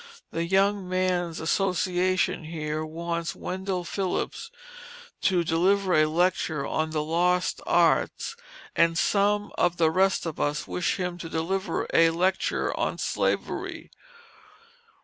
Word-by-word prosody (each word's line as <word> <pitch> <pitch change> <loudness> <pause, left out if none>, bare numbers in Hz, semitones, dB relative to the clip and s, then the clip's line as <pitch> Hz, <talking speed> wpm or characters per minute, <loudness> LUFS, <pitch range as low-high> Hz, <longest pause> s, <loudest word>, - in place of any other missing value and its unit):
The 165 - -1
young 195 +1 +2
men's 180 -2 0
association 185 0 0
here 155 -1 -3
wants 170 +1 -4
Wendell 185 0 -3
Phillips 195 - -3 0.7
to 180 -3 +2
deliver 185 +4 +2
a 155 -1 +5
lecture 160 -3 0
on 155 0 -1
the 155 -1 -1
lost 175 +3 +1
arts, - - +2 0.4
and 165 0 +3
some 205 +2 +2
of 175 0 +2
the 160 -2 +3
rest 190 +2 +2
of 165 -2 -5
us 145 +1 -1
wish 180 - -1
him 180 -2 -3
to 165 - -6
deliver 175 +3 -1
a 165 0 +6
lecture 180 +3 0
on - - -1
Slavery. - - -2
175 Hz, 125 wpm, -26 LUFS, 165-185 Hz, 0.7 s, a